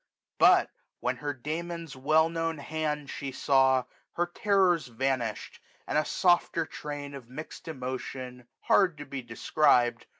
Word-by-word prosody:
But, - - +6 0.3
when 125 +1 -1
her 145 +3 -3
Damon's 160 +3 -5
well 155 +4 +3
known 165 -1 -2
hand 150 0 -3
she 135 0 -5
saw. 130 -1 +3 0.3
Her 175 - +1
terrors 180 -2 +2
vanished, 120 -2 -2 0.3
and - - -3
a 155 0 +3
softer 175 -2 +2
train 145 -2 -7
Of 130 -4 -10
mixt 155 +6 -9
emotions, 130 -3 -6 0.2
hard 180 -6 +3
to 145 - -7
be 135 -1 -5
described. 120 +1 +2
145 Hz, 135 wpm, -29 LUFS, 130-160 Hz, 0.3 s, But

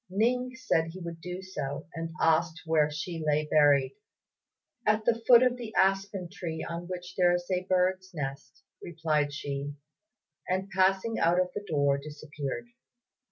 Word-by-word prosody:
Ning 250 +6 +1
said 165 -11 +1
he 170 +3 -8
would 170 -2 -7
do 180 +2 -6
so, 150 -4 -5
and 165 0 -4
asked 160 0 +2
where 155 -2 +3
she 165 +1 -5
lay 150 0 +1
buried. 145 -3 +4 0.9
"At 215 0 +2
the 230 -1 +2
foot 245 -1 +8
of 250 -1 +2
the 230 -3 -8
aspen 195 -1 +1
tree 170 -4 -5
on 170 +1 -5
which 180 0 -6
there 175 -1 +4
is 175 0 -3
a 185 0 0
bird's 185 0 +1
nest," 140 -4 -6 0.2
replied 155 -3 0
she; 140 0 -4 0.7
and 190 +1 -1
passing 190 +4 +2
out 170 +2 +3
of 180 0 +1
the 205 - -4
door, 140 -2 +2
disappeared. 150 - -6
175 Hz, 160 wpm, -29 LUFS, 155-190 Hz, 0.9 s, foot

